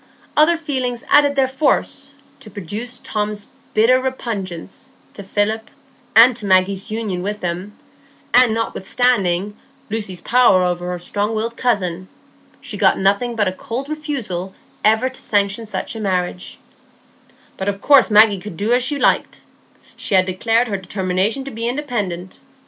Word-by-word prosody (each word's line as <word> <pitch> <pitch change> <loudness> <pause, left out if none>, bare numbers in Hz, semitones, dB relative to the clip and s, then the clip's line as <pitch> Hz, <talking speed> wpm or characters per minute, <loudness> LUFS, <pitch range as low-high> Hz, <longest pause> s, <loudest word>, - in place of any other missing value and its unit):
Other 320 +3 +5
feelings 260 -6 -2
added 285 -1 +5
their 270 -1 +3
force 275 0 -1 0.2
to 230 - -12
produce 210 +6 -6
Tom's 210 0 -3 0.2
bitter 240 +4 +4
repugnance 225 -3 -5 0.2
to - - -9
Philip, 210 +3 -1 0.5
and 235 +2 +8
to 210 -4 -6
Maggie's 190 +2 +2
union 215 -5 -3
with 205 +2 -4
him; 180 +4 -4 0.6
and 250 -2 +6
notwithstanding 205 -3 0 0.4
Lucy's 205 -5 -3
power 240 -7 +4
over 175 0 -1
her 180 - -3
strong 205 +5 -2
willed 230 +2 -2
cousin, 185 -8 -1 0.5
she - - -7
got - - +4
nothing 200 +5 +1
but 210 -3 +1
a - - 0
cold 240 +8 -6
refusal 255 - -4 0.3
ever 220 +4 +3
to 260 0 -8
sanction 205 +2 0
such 215 - -4
a - - -5
marriage; 180 -3 -3 1.0
"but 190 +1 -2
of 200 -1 -4
course 280 +1 +5
Maggie 210 -2 +6
could 180 -3 -9
do 215 +4 +1
as 250 - +3
she 290 +3 -1
liked,—she 210 - -2
had 185 0 +5
declared 225 +6 +1
her 200 -3 -2
determination 190 +5 -1
to 275 - -7
be 230 0 -3
independent. 210 -10 -4
215 Hz, 150 wpm, -19 LUFS, 190-250 Hz, 1.0 s, and